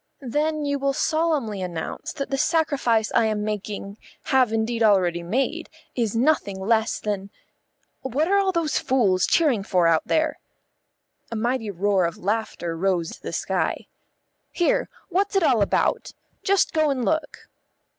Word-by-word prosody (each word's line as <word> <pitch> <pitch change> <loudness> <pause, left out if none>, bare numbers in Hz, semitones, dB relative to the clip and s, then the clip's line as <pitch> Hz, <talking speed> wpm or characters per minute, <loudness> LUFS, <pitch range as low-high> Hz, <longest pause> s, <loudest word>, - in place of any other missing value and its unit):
Then 305 0 0
you 285 0 -1
will 275 0 0
solemnly 305 - 0
announce 170 -3 -5
that 275 -2 -5
the 275 - +1
sacrifice 285 -8 +1
I 230 - +4
am 215 -1 -1
making, 210 -1 -5 0.2
have 255 -4 +3
indeed 225 +1 -1
already 185 -5 +3
made, 225 +11 -2 0.3
is 230 -3 -1
nothing 230 -6 +1
less 220 +3 +1
than 200 -2 -3 0.7
What 270 +4 0
are 400 +2 +3
all 390 -1 +2
those 335 -4 0
fools 200 -8 +2
cheering 285 -11 +3
for 185 -3 +1
out 165 -1 +2
there?" 315 -1 +1 0.9
A - - -3
mighty 235 0 -1
roar 195 -1 +1
of 170 - -3
laughter 200 -4 -2
rose 175 -1 0
to - - -28
the - - -5
sky. - - -1 0.7
"Here, 350 - +1 0.2
what's 390 +3 0
it 385 - +3
all 240 -8 +3
about? 200 - 0 0.3
Just 395 -1 +2
go 310 -2 +2
and 260 -4 -1
look." 315 -1 -2
230 Hz, 155 wpm, -24 LUFS, 200-300 Hz, 0.9 s, I